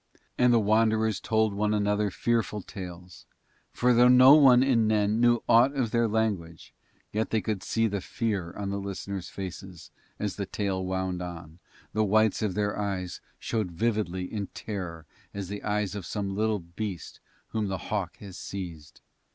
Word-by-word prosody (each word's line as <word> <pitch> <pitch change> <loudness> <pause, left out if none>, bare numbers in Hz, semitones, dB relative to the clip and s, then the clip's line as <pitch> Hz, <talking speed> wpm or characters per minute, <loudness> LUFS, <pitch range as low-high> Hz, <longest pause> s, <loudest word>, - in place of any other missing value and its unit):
And 125 -1 +4
the 120 - +5
Wanderers 110 0 +2
told 110 -2 +1
one 105 +1 +1
another 105 0 +1
fearful 110 0 -1
tales, 90 -3 -9 0.4
for 125 0 +2
though 120 +1 +6
no 125 +2 +8
one 130 -4 +7
in 120 -5 +3
Nen 105 0 +2
knew 120 -1 +4
aught 120 +4 +5
of 125 -5 0
their 115 -1 +2
language, 105 -7 -2 0.4
yet 110 +1 0
they 110 - +1
could 105 0 -3
see 115 0 0
the 100 -3 -1
fear 105 -8 -2
on 100 -1 -4
the 100 - -2
listeners' 100 -1 -5
faces, 90 -3 -8 0.3
and - - -3
as 100 - -3
the 100 -2 -3
tale 95 -2 -2
wound 95 -1 -2
on, 85 -2 -8 0.3
the 110 - +2
whites 110 +1 +3
of 105 -4 -1
their 105 0 -1
eyes 95 -3 -3 0.2
showed 110 -5 -2
vividly 95 -1 -1
in 100 0 -4
terror 90 -6 -6 0.3
as 100 -3 -5
the 105 0 -5
eyes 105 -2 -1
of 100 -4 -6
some 100 -2 -3
little 110 +1 +1
beast 90 +1 -6 0.3
whom 110 -2 -1
the 95 -1 -2
hawk 100 -5 -2
has 100 -3 -10
seized. 85 -6 -7
105 Hz, 175 wpm, -27 LUFS, 95-110 Hz, 0.4 s, no